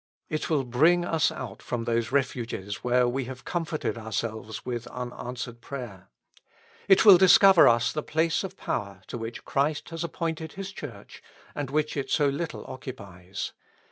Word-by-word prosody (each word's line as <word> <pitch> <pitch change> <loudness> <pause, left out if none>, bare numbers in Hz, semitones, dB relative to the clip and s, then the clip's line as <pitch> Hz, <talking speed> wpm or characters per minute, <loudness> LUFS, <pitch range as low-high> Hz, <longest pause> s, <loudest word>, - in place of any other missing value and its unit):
It 155 - -2
will 150 -4 +2
bring 160 +8 +3
us 165 -3 +2
out 120 -6 -7
from 120 -2 -3
those 115 0 0
refuges 120 -7 -1
where 125 0 +3
we 130 +1 -1
have 125 -1 -9
comforted 160 -7 -2
ourselves 110 -1 -4
with 120 -1 -4
unanswered 120 -1 -6
prayer. 120 - -8 0.8
It 195 +2 +6
will 195 -4 +10
discover 190 -1 +8
us 115 -1 +4
the 150 - -1
place 160 +4 0
of 190 0 -7
power 100 -4 -4
to - - -6
which 115 +1 -6
Christ 145 +2 0
has 165 0 -4
appointed 165 -1 -3
His 195 0 -6
Church, 120 - -10 0.3
and 145 -3 -4
which 150 +2 0
it 140 -2 -3
so 145 - +3
little 160 +4 -4
oc 130 0 -9
cupies. 95 -7 -6
130 Hz, 165 wpm, -27 LUFS, 115-160 Hz, 0.8 s, will